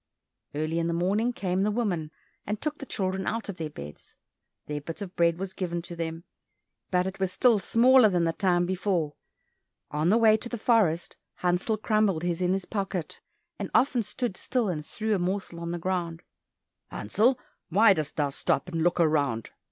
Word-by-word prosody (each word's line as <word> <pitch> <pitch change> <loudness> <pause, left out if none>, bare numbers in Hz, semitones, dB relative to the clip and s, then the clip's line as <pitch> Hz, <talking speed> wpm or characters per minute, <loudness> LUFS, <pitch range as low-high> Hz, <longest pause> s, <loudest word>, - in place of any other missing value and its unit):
Early 155 +2 -1
in 165 - 0
the 170 - 0
morning 200 +7 +1
came 190 -5 -1
the 205 - +2
woman, 200 -9 -1 0.4
and 210 0 -2
took 305 0 -3
the 275 - -7
children 190 0 -2
out 225 -1 -2
of 190 - -5
their 160 -2 -4
beds. 75 - -11 0.5
Their 150 0 -4
bit 165 +3 -7
of 195 -3 -7
bread 170 -1 +3
was 190 0 -4
given 170 -2 -3
to 175 - -7
them, 165 0 -4 0.7
but 180 -1 +2
it 190 +1 -5
was 190 -1 0
still 230 +2 +4
smaller 245 +2 +5
than 175 -3 +1
the 165 0 +1
time 175 -2 +2
before. 180 -4 -1 0.8
On 150 +3 +1
the 215 - +5
way 225 -2 +6
into 220 +3 0
the 240 - -3
forest 205 -8 +2 0.2
Hansel 180 +5 0
crumbled 215 -6 +1
his 175 0 -1
in 180 0 +2
his 195 -1 -2
pocket, 195 -5 -4 0.4
and - - -3
often 255 -2 +4
stood 220 -1 -3
still 245 -5 0
and 155 -4 -3
threw 220 +7 -2
a 200 - +1
morsel 180 -1 -2
on 170 0 -4
the 175 - -2
ground. 170 -2 -2 0.7
"Hansel, 230 - +1 0.3
why 200 +4 +6
dost 155 -4 -4
thou 145 -2 0
stop 180 - -1
and 165 -2 -2
look 175 +1 +2
round?" 145 -9 +1
185 Hz, 190 wpm, -27 LUFS, 170-215 Hz, 0.8 s, way